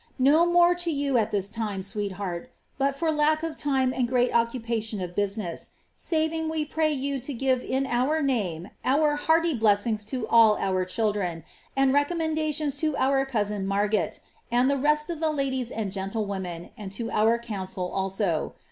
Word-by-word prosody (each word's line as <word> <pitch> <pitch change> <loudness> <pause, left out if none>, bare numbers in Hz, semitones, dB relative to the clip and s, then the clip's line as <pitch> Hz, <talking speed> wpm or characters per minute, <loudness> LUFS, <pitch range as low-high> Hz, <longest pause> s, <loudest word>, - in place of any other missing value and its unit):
No 295 +6 +5
more 345 0 +5
to 350 -1 -2
you 280 -4 +1
at 220 -1 0
this 200 -2 -2
time, 210 -4 -3
sweetheart, 200 0 -4 0.3
but 275 0 +1
for 320 +3 0
lack 310 +1 +2
of 325 -1 -3
time 265 -3 +1
and 250 -2 0
greit 250 -1 +2
occupation 230 -2 0
of 180 -1 -5
business, 200 -3 -3 0.2
saving 320 0 -1
we 315 -1 -1
pray 310 +1 0
you 280 -1 -2
to 265 +4 -5
give 260 +1 +1
in 265 +1 -1
our 265 +5 +1
name 200 - -1
our 295 +3 +3
hearty 325 +2 +2
bless 210 -4 +3
ings 215 -3 -1
to 235 0 -4
all 225 -2 +6
our 185 -1 0
children, 185 -4 -1 0.3
and 270 -1 +4
recommendations 310 -1 0
to 310 0 0
our 270 0 +2
cousin 210 -5 -1
Marget,' 205 +2 0 0.3
ud 245 +2 +3
tbe 280 -2 0
rest 300 0 +2
of 330 - -5
the 320 -1 +1
ladies 265 -4 -1
and 215 -5 -3
gentlewomen, 190 -3 -4
and 205 -5 -8
to 230 +2 -4
our 220 +2 +3
council 190 -5 -4
also. 190 -3 -1
245 Hz, 175 wpm, -26 LUFS, 205-290 Hz, 0.3 s, all